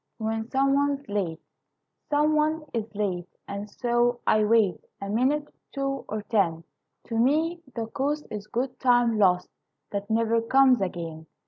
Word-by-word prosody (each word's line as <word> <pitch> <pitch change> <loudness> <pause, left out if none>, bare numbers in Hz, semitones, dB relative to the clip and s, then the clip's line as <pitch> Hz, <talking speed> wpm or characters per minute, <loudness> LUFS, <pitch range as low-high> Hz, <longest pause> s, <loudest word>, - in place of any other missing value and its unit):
When 220 0 -2
Some 275 0 +2
One's 280 0 +1
Late 185 -6 -2 0.7
Some 300 +1 +3
one 305 +1 +1
is 225 -2 -2
late, 185 -4 -2 0.2
And 200 +1 -5
so 240 +1 +1
I 215 0 +4
wait 210 -4 +3 0.2
A 200 - -5
minute, 270 +7 +1 0.3
two, 275 0 -2
or 215 -1 -3
ten; 175 -7 +1 0.4
To 225 -1 -3
me 320 +7 +2
the 230 -2 -2
cost 285 +6 -2
Is 210 -1 -6
good 250 +3 -3
time 240 -3 +3
lost 180 -3 +3 0.4
That 200 +1 -4
never 230 +1 +2
comes 255 0 +4
again. 165 -4 -4
230 Hz, 150 wpm, -26 LUFS, 205-275 Hz, 0.7 s, I